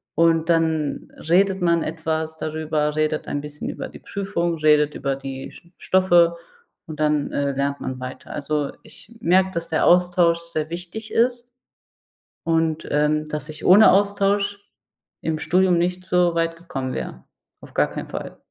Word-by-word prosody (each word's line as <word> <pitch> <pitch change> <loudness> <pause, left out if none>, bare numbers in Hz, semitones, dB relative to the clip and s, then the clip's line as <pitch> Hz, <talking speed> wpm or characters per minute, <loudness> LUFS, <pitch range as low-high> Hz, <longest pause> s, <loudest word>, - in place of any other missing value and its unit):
und 165 0 +3
dann 160 -3 0 0.2
redet 190 +1 +3
man 170 -1 +2
etwas 160 0 -3
darüber, 155 -1 -2
redet 155 0 -1
ein 145 - -2
bisschen 150 0 -7
über - - -6
die - - -12
Prüfung, 185 -4 -2
redet 150 -1 +3
über 135 -1 -2
die 135 -1 -7
St 170 - -17
Stoffe 175 -2 +3 0.5
und 155 -1 -6
dann, 150 -1 +1
äh, 140 0 0
lernt 140 +1 -2
man 130 -1 -4
weiter. 130 +1 -8
Also, 150 0 -2
ich 225 - -16
merke, 190 -2 +3
dass 170 -2 -4
der 160 - +1
Austausch 175 -1 +4
sehr 160 -2 -4
wichtig 180 +6 -7
ist 245 +1 0 0.9
und, 165 -1 0
ähm, 150 +1 +1
dass 150 0 -5
ich 155 0 -8
ohne 205 +4 +8
Austausch 200 0 +1 0.6
im 160 -1 -1
Studium 180 +1 +3
nicht 180 +2 -1
so 180 -1 +2
weit 165 0 0
gekommen 135 -7 -5
wäre. - - -6 0.4
Auf - - -14
gar - - +2
keinen - - -6
Fall. - - -7
165 Hz, 160 wpm, -22 LUFS, 150-180 Hz, 0.9 s, ohne